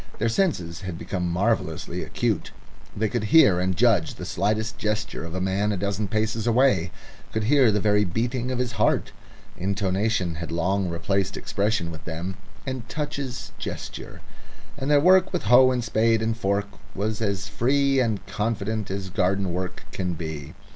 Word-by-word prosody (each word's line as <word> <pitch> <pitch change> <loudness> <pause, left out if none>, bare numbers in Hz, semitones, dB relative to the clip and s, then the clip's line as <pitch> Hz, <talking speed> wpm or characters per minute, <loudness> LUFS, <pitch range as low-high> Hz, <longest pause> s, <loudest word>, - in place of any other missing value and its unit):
Their 115 - +1
senses 95 - 0
had 90 -3 -5
become 90 -1 -3
marvellously 100 +7 -1
acute; - - -1 0.5
they 110 +1 +1
could 115 0 -2
hear 105 - +6
and 90 0 0
judge 110 -10 +3
the - - -7
slightest 110 +3 -1
gesture 105 -5 -2
of 85 +1 -6
a - - -1
man 95 +3 0
a 100 - -1
dozen 100 +2 -1
paces 110 +2 -1
away 115 -7 +3 0.4
could 110 - -1
hear 130 0 +5
the 105 - +1
very 105 0 +3
beating 120 +7 -1
of 130 - -1
his 125 -1 -1
heart. - - +1 0.5
Intonation 95 -2 0
had 85 - -5
long 90 +3 0
replaced 95 +3 -1
expression 100 -4 -1
with 80 0 -9
them, 85 +3 -4 0.3
and 130 -4 -5
touches 145 -3 -4
gesture, - - -6 0.5
and 140 0 -3
their 145 -1 +6
work 185 +4 +5
with - - -2
hoe 125 +4 +7
and 125 -1 0
spade 115 0 +2
and 110 0 0
fork 100 -2 0 0.3
was 105 +2 -2
as 100 -2 -1
free 135 +4 +2
and 110 -5 0
confident 110 -1 -2
as 95 -1 -4
garden 95 0 +1
work 90 0 -4
can 90 -2 -2
be. 80 -2 -6
105 Hz, 170 wpm, -25 LUFS, 95-115 Hz, 0.5 s, hoe